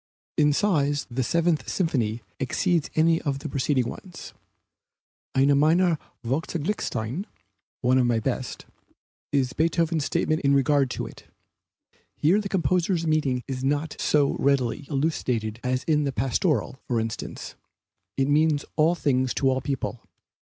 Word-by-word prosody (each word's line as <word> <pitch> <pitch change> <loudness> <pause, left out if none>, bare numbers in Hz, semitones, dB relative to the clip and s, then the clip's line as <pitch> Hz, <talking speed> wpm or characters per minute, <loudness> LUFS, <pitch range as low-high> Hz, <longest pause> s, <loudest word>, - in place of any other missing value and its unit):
In 150 -1 +4
size 145 -4 +1
the 130 +2 -1
Seventh 170 +5 +1
Symphony 120 - -1 0.2
exceeds 165 +5 0
any 165 +1 +3
of 140 -3 -1
the 140 - -6
preceding 130 -3 0
ones. 175 +7 -9 1.0
"Eine 140 +2 +5
meiner 165 +3 +3 0.3
vorzüglichsten" 145 - -2 0.6
(one 130 +1 +3
of 125 - +3
my 120 -2 +2
best), 110 - -3 0.7
is 130 -3 +1
Beethoven's 165 0 +1
statement 155 +3 0
in 140 -1 +3
regard 140 0 +3
to - - -4
it. - - -12 0.9
Here 180 +8 +3
the 200 - -5
composer's 175 0 +1
meaning 150 -6 +1
is 130 -2 -4
not 145 +3 0
so 145 -2 +2
readily 140 0 +1
elucidated 125 -7 -1
as 125 +1 0
in 150 -2 +2
the 140 - 0
Pastoral, 130 - 0
for 120 -2 +1
instance. 110 0 -5 0.6
It 135 0 +2
means 150 0 +2
all 160 +3 +4
things 130 -5 0
to 135 -2 +2
all 130 0 0
people. 130 -3 -3
145 Hz, 140 wpm, -25 LUFS, 130-160 Hz, 1.0 s, Eine